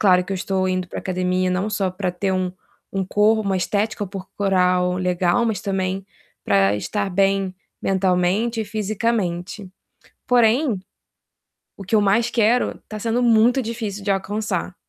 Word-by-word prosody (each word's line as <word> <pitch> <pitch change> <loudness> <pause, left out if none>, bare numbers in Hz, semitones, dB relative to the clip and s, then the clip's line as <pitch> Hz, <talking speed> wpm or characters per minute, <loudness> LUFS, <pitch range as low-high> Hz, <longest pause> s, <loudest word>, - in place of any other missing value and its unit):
claro 180 -3 +4
que 195 - -5
eu - - 0
estou 185 0 -1
indo 185 -1 -1
pra - - -6
academia 185 0 0
não 185 +4 -1
só 195 -2 0
para 185 0 -2
ter 190 +2 -2
um 185 -1 -1 0.4
um 195 -1 -1
corpo 210 +3 +3
uma 195 -2 0
estética 205 +3 -1
corporal 185 -2 0
legal, 180 +4 +1
mas 220 -3 -1
também, 190 -1 -2 0.4
pra 100 +1 +3
estar 200 - -2
bem 195 0 +1 0.3
mentalmente 190 +4 +1
e - - -6
fisicamente. 205 -3 -2 0.6
Porém, 245 -1 +3 1.0
o 200 - -9
que 200 - -2
eu 215 - +6
mais 205 +3 +2
quero 235 +1 +1
tá 215 - -6
sendo 230 +3 0
muito 240 +2 +4
difícil 220 -3 -4
de 200 - -2
alcançar. 195 -1 -2
195 Hz, 155 wpm, -22 LUFS, 185-215 Hz, 1.0 s, eu